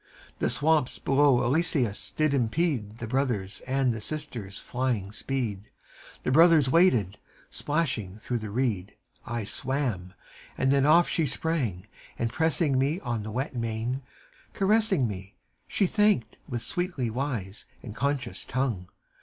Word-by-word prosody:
The - - +1
swamps 150 -3 +2
below 140 -2 +3
Eleusis 135 - +1
did 155 -2 +2
impede 120 -4 0
The 115 - -5
brothers' 115 -6 -1
and 130 -2 +2
the 110 - -6
sister's 120 -11 -5
flying 120 -6 -2
speed: 110 -4 -3 0.5
The - - 0
brothers 160 -2 +6
waded: 120 - +3 0.3
splashing 135 - -1
through 120 +2 -3
the 110 -1 -6
reed, 105 -4 -1 0.3
I 120 -1 -2
swam: 120 -6 -2 0.4
then 135 +1 +3
off 170 +3 +6
she 160 -3 +1
sprang, 130 - -1 0.3
and 115 -1 -2
pressing 160 -4 +2
me 145 +6 +1
On 120 -4 -2
the 105 - -6
wet 130 +5 -3
mane, 115 +3 -2 0.5
caressing 195 - +3
me, 95 -1 -7 0.3
She 200 - +1
thanked 205 - +2
with 120 -1 -3
sweetly 175 - -2
wise 115 -6 -4 0.2
and 110 -3 -8
conscious 140 -3 -2
tongue. 115 -8 -2
130 Hz, 135 wpm, -27 LUFS, 110-150 Hz, 0.5 s, brothers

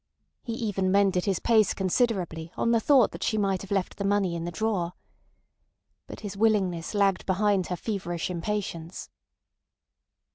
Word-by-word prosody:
He 235 - -5
even 205 -5 -1
mended 195 -2 +3
his 195 -3 +1
pace 220 +1 +3
considerably 185 -5 -1
on 230 - +1
the 230 - +4
thought 255 0 +4
that - - -9
she 220 - 0
might 195 -2 0
have 195 - -10
left 195 -2 -1
the 200 - -3
money 195 -3 +1
in 165 0 -4
the 175 - -4
drawer. 180 -2 -1 1.1
But - - -9
his 205 -2 -6
willingness 195 -5 +1
lagged 200 -2 +2
behind 195 -1 +2
her 180 - -2
feverish 175 -4 -3
impatience. 175 -2 -4
195 Hz, 155 wpm, -27 LUFS, 180-210 Hz, 1.1 s, the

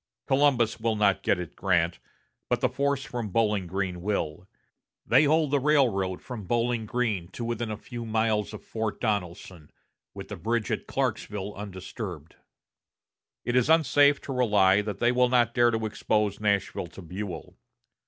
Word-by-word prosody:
Columbus 135 -5 +2
will 110 0 0
not 100 -2 +2
get 100 - +2
at 90 -3 -7
Grant, 85 -3 +1 0.5
but - - +1
the - - +2
force 140 0 0
from 120 -4 -4
Bowling 105 -3 +1
Green 90 -1 -3
will. 90 -3 -2 0.6
They 155 - +5
hold 155 0 +2
the 145 - +3
railroad 120 -11 +2
from 120 -6 -7
Bowling 120 0 0
Green 110 -8 -1
to 120 - -5
within 120 -1 -2
a 110 - -4
few 120 +1 -7
miles 110 -2 0
of - - -9
Fort 110 -1 -3
Donelson, 90 -6 -3 0.5
with - - -8
the - - -6
bridge 115 -1 -1
at - - -3
Clarksville 105 -1 -2
undisturbed. 95 -4 -7 1.1
It 120 - -1
is 125 +3 +3
unsafe 145 -2 +5
to 135 - -5
rely 105 -6 +4
that 105 -1 -4
they 120 0 +3
will 125 0 +3
not 120 -2 +3
dare 120 -1 +4
to 110 -1 -1
expose 105 -1 0
Nashville 100 -4 0
to 85 - -12
Buell. 90 0 -7
110 Hz, 165 wpm, -27 LUFS, 95-120 Hz, 1.1 s, They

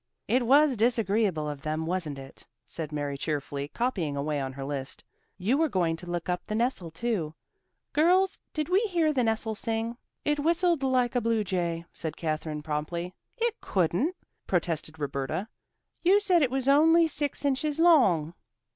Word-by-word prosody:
"It 245 0 +2
was 285 +1 +5
disagreeable 215 -7 +1
of 145 -2 -5
them, 155 +2 -2
wasn't 165 -5 -2
it?" 135 0 -11 0.2
said 155 +2 -5
Mary 145 -2 -3
cheerfully, 145 -2 -3
copying 175 - -2
away 145 0 -1
on 135 -1 -4
her 135 0 -6
list. 135 -1 -4 0.3
"You 220 +10 +1
were 320 -1 +3
going 170 -6 +1
to 175 +1 -9
look 175 -1 -3
up 180 0 -1
the 215 - -2
nestle 230 -7 0
too. 165 -4 -2 0.6
Girls, 365 +5 +3
did 305 -1 -2
we 370 +2 +4
hear 330 -4 +2
the 255 -3 +1
nestle 220 -1 0
sing?" 225 +1 -2 0.3
"It 295 0 +1
whistled 335 +1 +2
like 255 -2 +2
a 245 - +2
blue 225 -1 +1
jay," 170 -3 -2
said 160 -1 -5
Katherine 155 -1 -3
promptly. 160 +4 -3 0.2
"It 470 -1 -1
couldn't," 190 - 0 0.3
protested 165 -3 -1
Roberta. 145 +6 -3 0.5
"You 380 +4 +5
said 370 -4 +3
it 270 - +3
was 265 0 -2
only 325 +4 +6
six 290 -1 -3
inches 285 +2 0
long." 240 - +4
205 Hz, 165 wpm, -28 LUFS, -, 0.6 s, only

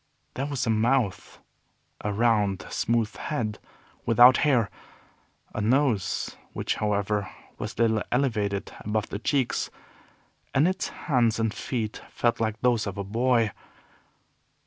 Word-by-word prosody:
There 135 +2 -2
was 140 -3 -2
a 115 - +2
mouth; 110 -2 +1 0.7
a 105 - -1
round, 105 -3 +2
smooth 115 -2 0
head 110 -8 -3 0.4
without 120 +2 +7
hair; 125 -8 +2 0.8
a 110 - -2
nose, 120 -3 +1 0.2
which, - - -1
however, 105 -1 0 0.3
was - - -5
little 110 -1 +2
elevated 105 -6 0
above 105 0 -2
the 100 - -4
cheeks; 130 +1 0 0.9
and 140 +5 +5
its 185 0 -1
hands 120 -7 +1
and 110 -1 0
feet 110 -4 -3
felt 120 -1 0
like 110 -1 -1
those 120 -4 +2
of 100 0 -5
a 100 - -2
boy. 115 +1 +2
115 Hz, 125 wpm, -26 LUFS, 105-125 Hz, 0.9 s, without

